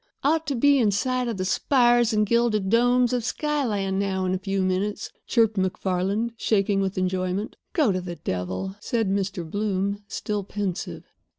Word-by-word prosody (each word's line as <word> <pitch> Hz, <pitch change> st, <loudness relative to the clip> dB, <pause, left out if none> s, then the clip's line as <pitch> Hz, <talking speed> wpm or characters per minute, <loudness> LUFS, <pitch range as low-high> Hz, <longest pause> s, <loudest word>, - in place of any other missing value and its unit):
"Ought 315 Hz, +2 st, +2 dB
to 280 Hz, -, 0 dB
be 280 Hz, +3 st, +4 dB
in 225 Hz, -4 st, +3 dB
sight 250 Hz, +5 st, 0 dB
of 230 Hz, -4 st, -3 dB
the 185 Hz, -, -2 dB
spires 240 Hz, +2 st, +3 dB
and 215 Hz, -1 st, +2 dB
gilded 215 Hz, -3 st, +1 dB
domes 245 Hz, +1 st, +3 dB
of 245 Hz, -2 st, 0 dB
Skyland 225 Hz, -9 st, -1 dB
now 190 Hz, -1 st, -1 dB
in 185 Hz, -, 0 dB
a 185 Hz, -, -1 dB
few 195 Hz, 0 st, -1 dB
minutes," 185 Hz, +3 st, -1 dB, 0.2 s
chirruped 225 Hz, -3 st, +2 dB
MacFarland, 190 Hz, +4 st, -1 dB
shaking 200 Hz, -3 st, +1 dB
with 190 Hz, -1 st, -2 dB
enjoyment. 185 Hz, +2 st, -1 dB, 0.2 s
"Go 295 Hz, -, +3 dB
to 185 Hz, -1 st, -1 dB
the 175 Hz, -1 st, -6 dB
devil," 95 Hz, -, -4 dB
said 220 Hz, -1 st, -1 dB
Mr. 195 Hz, -3 st, -2 dB
Bloom, 200 Hz, +1 st, -1 dB
still 205 Hz, -1 st, -3 dB
pensive. 200 Hz, -1 st, -4 dB
205 Hz, 170 wpm, -25 LUFS, 190-235 Hz, 0.2 s, be